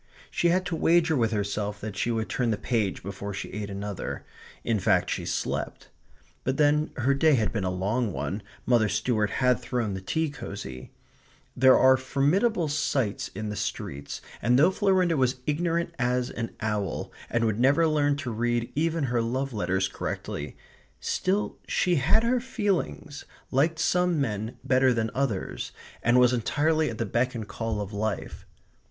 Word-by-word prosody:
She 175 - +1
had 185 +2 +2
to 175 -1 -2
wager 165 0 +3
with 115 -4 +2
herself 105 0 -2
that 105 -1 -5
she 105 +4 -1
would 115 -2 -1
turn 125 -2 0
the 110 - +1
page 110 -4 -1
before 100 +1 -5
she - - -5
ate 105 0 -4
another. 100 0 -5 0.4
In 115 -3 +1
fact - - +2
she - - -3
slept. - - -3 0.5
But 130 +1 -1
then 150 +1 +3
her 130 +2 +2
day 150 +2 +4
had 110 -1 0
been 110 -4 -1
a 95 - 0
long 100 +5 0
one, 100 +3 -3 0.2
Mother 115 -4 +3
Stuart 105 +1 +1
had 125 +2 +2
thrown 120 -4 -2
the 95 - -5
tea 160 +10 -1
cosy; 65 - -7 0.7
there 130 +1 +6
are 130 0 +6
formidable 160 - +1
sights 140 -7 0
in 110 +1 -4
the 105 - -4
streets, 70 -7 -4 0.2
and 120 +3 +3
though 160 +7 +5
Florinda 185 -4 +2
was 130 -1 +2
ignorant 170 +2 0
as 125 0 0
an 115 -1 -5
owl, 105 -4 -2 0.2
and 120 -1 +1
would 110 -1 0
never 140 +6 +4
learn 145 -2 +2
to 130 -4 -4
read 120 +1 -1
even 165 +1 0
her 120 -3 +1
love 130 +3 -2
letters 95 -3 0
correctly, 75 -5 -5 0.4
still 195 +3 -1
she 180 -2 +2
had 180 - +3
her 245 +2 +2
feelings, 195 - -2 0.3
liked 155 +5 +2
some 180 0 +2
men 110 -3 -2
better 130 -1 +3
than 110 -1 -1
others, 125 -8 -2 0.3
and 120 +1 +4
was 125 0 +5
entirely 155 +6 +1
at 115 - -6
the 115 - -1
beck 120 +4 0
and 110 -3 -5
call 115 -1 -3
of 105 0 -5
life. 105 0 -3
125 Hz, 170 wpm, -27 LUFS, 105-150 Hz, 0.7 s, there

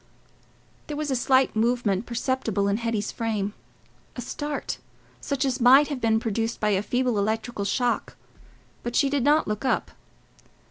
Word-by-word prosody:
There 295 - -4
was 300 -2 -2
a - - +2
slight 260 +1 +3
movement 225 -3 +1
perceptible 235 -4 -1
in 200 +1 +1
Hetty's 230 -3 -2
frame—a 215 +2 -6
start 290 +4 -4 0.4
such 280 -1 -1
as 260 -2 -1
might 270 +5 +7
have 280 -4 -4
been 220 -1 +3
produced 225 +1 -2
by 210 - +1
a 195 -2 +2
feeble 245 +1 0
electrical 220 +1 -2
shock—but 240 +1 -4
she 275 -1 +3
did 285 -3 +1
not 295 +3 +3
look 210 +2 -3
up. 260 - 0
240 Hz, 145 wpm, -25 LUFS, 215-265 Hz, 0.4 s, might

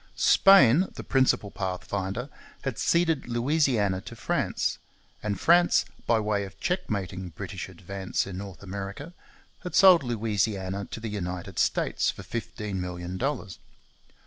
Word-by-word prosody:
Spain, 185 - +6
the - - -6
pioneer 130 -6 +2
pathfinder, 95 +4 -3 0.4
had 135 -5 -3
ceded 165 -6 +2
Louisiana 120 -6 +1
to - - -10
France; - - -1 0.4
and 100 -3 -2
France, 175 +2 +4 0.2
by 115 -1 +4
way 105 -1 0
of 95 - -10
checkmating 100 - -2
British 80 - -7
advance 95 +1 -3
in 95 -1 -6
North 100 -1 -9
America, 100 - -6 0.5
had 180 - -6
sold 185 -4 +8
Louisiana 105 -5 -1
to - - -6
the 115 - -5
United 90 -4 -4
States - - +1
for - - -5
fifteen 105 -4 -4
million 90 0 -5
dollars. 130 -9 -3
105 Hz, 130 wpm, -27 LUFS, 95-135 Hz, 0.5 s, sold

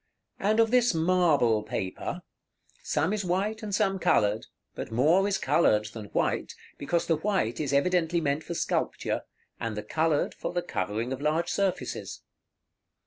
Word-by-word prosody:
And 215 +3 +2
of 225 -1 +4
this 245 -6 +4
marble 160 -10 +3
paper, 95 -3 -4 0.6
some 160 +6 0
is 210 -1 -1
white 195 +5 -1
and 215 - -5
some 195 -3 +1
colored; 105 - +2 0.3
but - - -6
more 160 - +3
is 200 - +1
colored 105 -10 +3
than 110 -2 -7
white, - - -1 0.2
because 170 +4 0
the 165 - +2
white 170 - 0
is 145 -3 -1
evidently 170 +3 +2
meant 145 -1 -1
for 170 - -5
sculpture, - - -1 0.4
and 115 -2 -3
the 105 - -3
colored 155 +6 0
for - - -5
the 175 0 -1
covering 110 - -2
of 135 - -6
large 160 +3 0
surfaces. 195 -2 -2
165 Hz, 155 wpm, -28 LUFS, 125-190 Hz, 0.6 s, of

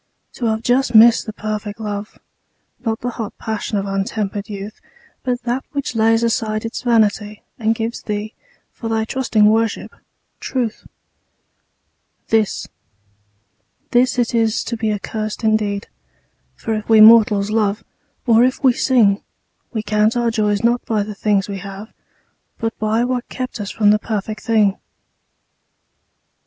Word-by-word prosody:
To 240 - -2
have 220 0 -1
just 245 0 +1
missed 230 +1 +7
the 215 - -5
perfect 210 -1 -5
love, 210 -1 -5 0.7
Not 225 -2 -2
the 245 - -2
hot 225 -3 -6
passion 220 -1 -3
of 195 - -2
untempered 200 +1 -3
youth, 205 +1 -7 0.4
But 250 -1 -2
that 245 +2 -2
which 280 -1 -3
lays 225 +1 +3
aside 220 -1 -1
its 225 - -4
vanity 215 -3 +1 0.2
And 225 0 +1
gives 225 +1 -4
thee, 210 0 -4 0.4
for 225 - -6
thy 220 0 0
trusting 235 -4 +1
worship, 220 0 +1 0.5
truth 240 -5 -3 1.4
This, 220 -2 +1 1.2
this 250 +1 +3
it 245 -1 0
is 225 -2 +1
to 235 - -4
be 220 -1 -1
accursed 215 +2 -4
indeed; 210 -2 0 0.7
For 225 - -3
if 215 0 -4
we 220 -1 +6
mortals 215 -2 +7
love, 215 -1 0 0.4
or 230 -1 +5
if 255 +2 0
we 260 -2 +5
sing, 225 -6 +3 0.5
We 220 -3 -3
count 215 +2 +1
our 235 -1 +1
joys 210 -2 0
not 240 +1 +2
by 215 -2 0
the 210 +1 -6
things 200 -1 0
we 200 -1 -5
have, 200 +3 -9 0.6
But 225 0 -3
by 220 +2 +1
what 250 -1 -3
kept 255 -4 -5
us 200 - -5
from 205 -1 +3
the 210 - +3
perfect 215 -1 -4
thing. 210 -4 +2
220 Hz, 145 wpm, -19 LUFS, 210-230 Hz, 1.4 s, missed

